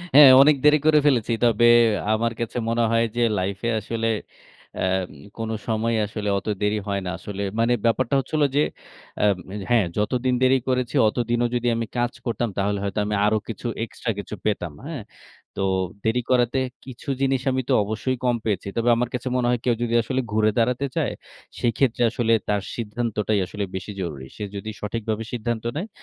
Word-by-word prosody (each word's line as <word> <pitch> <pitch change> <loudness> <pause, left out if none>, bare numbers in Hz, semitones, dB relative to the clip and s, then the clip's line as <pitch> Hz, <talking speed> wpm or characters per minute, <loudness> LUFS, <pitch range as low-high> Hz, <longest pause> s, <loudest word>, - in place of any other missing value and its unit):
হ্যাঁ, 145 -2 +11
অনেক 150 +2 +6
দেরি 150 0 +7
করে 155 -1 +6
ফেলেছি। 120 -5 +2
তবে 120 0 +4 0.5
আমার 115 +1 +1
কাছে 115 +1 -3
মনে 115 0 +1
হয় 115 0 +3
যে, 120 - 0 0.2
লাইফ 95 +1 -2
এ - - +2
আসলে, 115 +2 -2 0.7
অ্যাম 95 -1 0 0.3
কোন 115 -1 -3 0.2
সময় 115 +1 0
আসলে 105 0 -4
অত - - -6
দেরি 105 +1 +1
হয় 100 0 0
না। 90 - -2
আসলে 100 +2 -6 0.2
মানে 120 +1 +3
ব্যাপারটা 115 +3 +1
হচ্ছে 135 - -7
হলো 145 - +4
যে, - - +5 0.6
আম 100 -3 +3 0.2
এ - - -5 0.2
হ্যাঁ, 115 -5 +4
যতদিন 125 +4 +1
দেরি 130 +1 +5
করেছি, 125 +1 0
অতদিনও 120 +1 0
যদি 120 0 0
আমি 115 0 -1
কাজ 120 0 +1
করতাম? 120 -1 -1
তাহলে 100 +1 0
হয়তো 100 +1 -2
আমি 105 0 -1
আরো 110 +1 +3
কিছু, 115 +1 -5 0.2
এক্সট্রা 115 +1 -4
কিছু 100 - -6
পেতাম। 90 -7 -1
হ্যাঁ? 150 -7 -5 0.6
তো - - +1 0.4
দেরি 115 +3 +2
করাতে 125 +1 +3 0.3
কিছু 130 +2 -9
জিনিস 135 -1 +2
আমি 130 - 0
তো 135 - +4
অবশ্যই 110 +5 -2
কম 120 -1 +3
পেয়েছি। 100 -3 -1
তবে 115 +1 +2
আমার 120 0 -1
কাছে 125 0 -3
মনে 125 -1 +1
হয়, 125 -1 +1
কেউ 120 -2 +2
যদি 115 -1 -1
আসলে 130 +3 -1
ঘুরে 110 0 +3
দাঁড়াতে 125 +4 +1
চায়? 150 -8 0 0.5
সেক্ষেত্রে 120 +1 +1
আসলে 115 -2 +1 0.2
তার 105 -1 +1
সিদ্ধান্তটাই 110 -2 -1
আসলে 100 +3 -5
বেশি 95 +2 -5
জরুরি। 75 -7 -5
সে 105 - -5
যদি 100 +2 -5
সঠিকভাবে 110 +1 -3
সিদ্ধান্ত 120 -1 -2
নেয়? 180 +8 -3
115 Hz, 185 wpm, -23 LUFS, 105-125 Hz, 0.7 s, হ্যাঁ